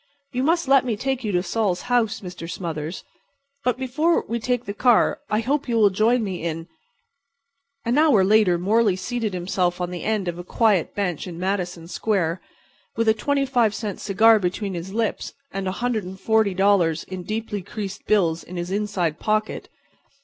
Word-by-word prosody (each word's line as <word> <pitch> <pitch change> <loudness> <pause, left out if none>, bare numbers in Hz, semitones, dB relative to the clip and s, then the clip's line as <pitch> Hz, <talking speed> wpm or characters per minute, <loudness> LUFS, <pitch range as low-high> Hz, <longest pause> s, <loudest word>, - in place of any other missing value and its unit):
You 250 -1 -1
must 330 +2 +1
let 275 -1 +5
me 235 -5 -2
take 265 +2 -2
you 215 - -1
to 180 0 +1
Sol's 200 -5 0
house, 235 -3 +1
Mr. 180 -3 -8
Smothers. 165 -2 -5 0.6
But, 250 -1 +1
before 300 +6 +1
we 235 +1 -2
take 245 +1 -1
the 200 - -4
car 240 +2 +3
I 215 +1 +1
hope 280 +3 -1
you 235 - +1
will 210 -3 +5
join 225 +5 +2
me 190 -4 -4
in"— 165 0 -3 1.2
An 240 +5 +2
hour 285 -11 +5
later 200 -3 +4
Morley 205 +2 +2
seated 220 +1 -3
himself 180 0 -1
on 180 0 -2
the 180 - -5
end 215 -4 -1
of 175 0 -3
a - - -5
quiet 205 -2 +1
bench 185 -4 -2
in 170 -2 -7
Madison 180 -2 -2
Square, 185 -3 -1 0.5
with 230 0 0
a - - +6
twenty 275 +5 0
five 240 -5 +2
cent 210 -4 -4
cigar 220 +2 +5
between 195 +2 -2
his 175 +2 -6
lips 225 +1 -2 0.2
and 195 -4 -3
$140 195 -4 +1
in 185 -1 -6
deeply 215 0 -3
creased 200 +1 -6
bills 170 -6 +2
in 180 - -9
his 175 +1 -4
inside 190 -6 -1
pocket. 215 0 -1
205 Hz, 175 wpm, -23 LUFS, 180-230 Hz, 1.2 s, a